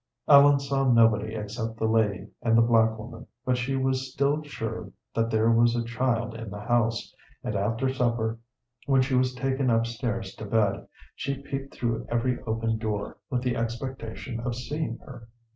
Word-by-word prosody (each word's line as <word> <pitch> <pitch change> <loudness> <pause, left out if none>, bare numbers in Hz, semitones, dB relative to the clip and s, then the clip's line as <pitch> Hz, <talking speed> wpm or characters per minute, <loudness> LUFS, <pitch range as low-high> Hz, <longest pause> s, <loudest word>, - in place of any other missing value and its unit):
Ellen 140 -1 +8
saw 135 -1 +1
nobody 115 -2 +4
except 110 +1 -4
the 110 - -1
lady 110 -3 +1
and 115 -2 +3
the 115 - +6
black 110 -1 +3
woman, 110 +3 -9 0.2
but 125 - +2
she 125 +2 -1
was 130 0 0
still 140 +3 +1
sure 115 -8 -5 0.2
that 115 0 +1
there 110 0 +3
was 115 +1 +4
a 120 - 0
child 120 0 -1
in 115 -1 -7
the 105 +1 -7
house, 115 +1 0 0.3
and 110 - -3
after 115 +6 0
supper, 115 -3 0 0.5
when 135 -2 +4
she 135 +1 -2
was 130 0 +2
taken 135 +1 0
up 115 0 +3
stairs 115 -3 -3
to 110 - -6
bed, 100 -2 +1 0.3
she 140 0 -4
peeped 135 0 -5
through 115 -2 -2
every 120 +1 0
open 115 0 0
door 105 -2 -3
with 125 -2 -1
the 125 -1 0
expectation 115 0 -4
of 120 0 -3
seeing 130 0 -3
her. 120 -4 -11
115 Hz, 175 wpm, -27 LUFS, 110-130 Hz, 0.5 s, Ellen